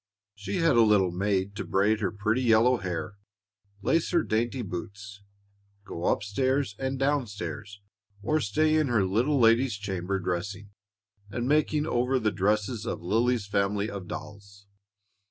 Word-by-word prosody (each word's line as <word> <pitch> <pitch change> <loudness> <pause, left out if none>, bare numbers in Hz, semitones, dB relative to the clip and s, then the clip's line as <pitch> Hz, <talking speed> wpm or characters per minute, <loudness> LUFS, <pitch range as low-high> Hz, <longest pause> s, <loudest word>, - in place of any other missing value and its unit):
She 100 -1 -5
had 165 -7 +3
a - - +7
little 105 -5 +4
maid 95 +1 -1
to - - -3
braid 105 +3 +1
her - - -1
pretty 110 +4 0
yellow 120 +1 +4
hair, 95 +1 -5 0.7
lace 165 +8 +1
her 170 -3 +2
dainty 120 +3 -1
boots, 100 +2 -7 0.6
go 85 - -6
up - - +1
stairs 130 +2 0
and 135 0 -2
down 135 -1 +1
stairs, 105 0 -7 0.4
or 155 +8 +1
stay 155 +8 +2
in 155 -2 +2
her 115 -6 +2
little 120 +10 +1
lady's 115 +1 +4
chamber 95 -2 -3
dressing 95 +3 -4 0.6
and 120 +3 -3
making 150 +1 +2
over 125 -2 +1
the 110 -4 0
dresses 105 +4 -1
of - - -4
Lily's 115 +4 +1
family 100 +1 0
of 95 -3 -7
dolls. 100 -1 -9
105 Hz, 155 wpm, -27 LUFS, 100-125 Hz, 0.7 s, a